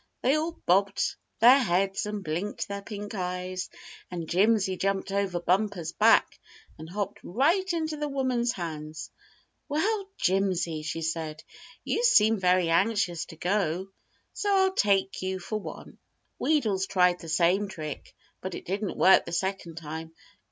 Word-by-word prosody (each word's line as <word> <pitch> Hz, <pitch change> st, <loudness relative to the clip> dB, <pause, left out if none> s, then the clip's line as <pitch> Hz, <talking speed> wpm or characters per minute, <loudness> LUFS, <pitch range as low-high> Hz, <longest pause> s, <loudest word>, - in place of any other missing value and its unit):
They 260 Hz, -, +4 dB
all 315 Hz, +2 st, 0 dB
bobbed 195 Hz, -, +1 dB, 0.3 s
their 250 Hz, +4 st, +8 dB
heads 195 Hz, -3 st, 0 dB
and 210 Hz, -1 st, -4 dB
blinked 175 Hz, +6 st, -3 dB
their 200 Hz, 0 st, -5 dB
pink 205 Hz, 0 st, -7 dB
eyes, 180 Hz, -1 st, -3 dB, 0.4 s
and 170 Hz, -3 st, -5 dB
Jimsy 195 Hz, +1 st, +2 dB
jumped 195 Hz, +1 st, -1 dB
over 195 Hz, -3 st, 0 dB
Bumper's 185 Hz, -2 st, 0 dB
back -, -, +4 dB, 0.4 s
and 160 Hz, +1 st, -9 dB
hopped 200 Hz, +2 st, -4 dB
right 330 Hz, -, +1 dB
into 315 Hz, -2 st, -2 dB
the 295 Hz, 0 st, -2 dB
woman's 255 Hz, -4 st, 0 dB
hands. 155 Hz, -4 st, -6 dB, 0.6 s
"Well, 390 Hz, +7 st, 0 dB
Jimsy," 185 Hz, -4 st, 0 dB
she 165 Hz, +1 st, -4 dB
said, 160 Hz, -1 st, -3 dB, 0.4 s
"you 470 Hz, -, -1 dB
seem 220 Hz, -, +5 dB
very 180 Hz, -1 st, +3 dB
anxious 180 Hz, -1 st, +1 dB
to -, -, -12 dB
go, 185 Hz, +1 st, -1 dB, 0.4 s
so 410 Hz, -, -1 dB
I'll 380 Hz, 0 st, +3 dB
take 195 Hz, -, +1 dB
you 190 Hz, 0 st, -2 dB
for 215 Hz, +4 st, -4 dB
one." -, -, -10 dB, 0.4 s
Wheedles 215 Hz, -11 st, +1 dB
tried 180 Hz, -1 st, +3 dB
the 165 Hz, -, -9 dB
same 180 Hz, +5 st, +2 dB
trick, 155 Hz, -6 st, -7 dB, 0.3 s
but 185 Hz, -1 st, -5 dB
it -, -, -8 dB
didn't 200 Hz, +2 st, -3 dB
work 190 Hz, -, +6 dB
the -, -, -7 dB
second 185 Hz, -1 st, -2 dB
time. 160 Hz, +1 st, -7 dB
195 Hz, 150 wpm, -27 LUFS, 175-220 Hz, 0.6 s, their